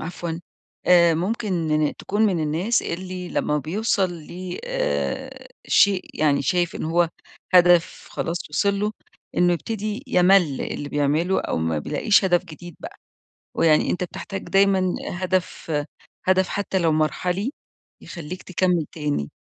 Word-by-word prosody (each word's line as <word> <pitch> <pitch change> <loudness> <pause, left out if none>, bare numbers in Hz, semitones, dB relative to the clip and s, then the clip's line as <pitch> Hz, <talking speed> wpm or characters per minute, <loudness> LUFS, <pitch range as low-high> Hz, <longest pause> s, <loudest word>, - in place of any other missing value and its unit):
عفوًا 170 0 -5 0.5
آآ، 170 -2 +6
ممكن 170 -5 0
تكون 205 +2 -1
من 180 -5 0
الناس 170 +10 +1
اللي 180 +1 -5
لمّا 150 0 0
بيوصل 190 - 0
ل 175 +3 -7
آآ - - -3 0.2
شيء 195 -2 +4
يعني 145 -2 +2
شايف 175 +4 0
إن - - -4
هو 170 +1 +2 0.5
هدف 175 -1 +4
خلاص 170 +1 -2
وصل 200 -1 +1
له، 210 +1 0 0.4
إنه 175 0 +4
يبتدي 215 +5 -3
يمل 180 -5 +4
اللي 145 - -4
بيعمله 150 +6 +1
أو - - -2
ما 80 -1 0
بيلاقيش 205 - +2
هدف 180 -1 +2
جديد 175 0 -11
بقى، - - -9 0.6
ويعني 155 -2 +4
أنت 180 - -1
بتحتاج 195 +2 -6
دايمًا 195 -2 +3 0.2
هدف 185 -2 -2 0.5
هدف 185 0 +3
حتى 200 -1 -1
لو 165 -3 +2
مرحلي 180 +8 0 0.5
يخلّيك 175 +1 -8
تكمل 180 -3 +1
تاني، 145 - -2
175 Hz, 135 wpm, -23 LUFS, 160-190 Hz, 0.6 s, آآ